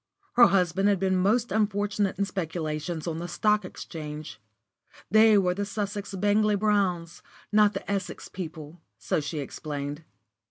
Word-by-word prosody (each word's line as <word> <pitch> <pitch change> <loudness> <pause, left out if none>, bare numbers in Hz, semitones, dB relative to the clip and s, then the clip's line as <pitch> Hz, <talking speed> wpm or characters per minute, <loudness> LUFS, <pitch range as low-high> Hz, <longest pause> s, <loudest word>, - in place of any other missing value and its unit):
Her 240 0 +8
husband 195 +1 +2
had 200 - +3
been 190 0 +1
most 215 +6 +2
unfortunate 205 -1 0
in 200 - +1
speculations 165 -3 -3
on 165 -2 -3
the 175 - -4
Stock 210 +4 +1
Exchange. 150 -8 -8 0.7
They 220 0 +6
were 180 -2 +2
the 200 +2 -2
Sussex 205 -1 -4
Bangley 205 +2 +2
Browns, 190 -5 0 0.3
not 210 -1 +5
the - - -5
Essex 200 -1 -3
people, 160 -2 -8 0.2
so - - -1
she 155 +2 -4
explained. 145 +1 -5
190 Hz, 145 wpm, -27 LUFS, 165-205 Hz, 0.7 s, Her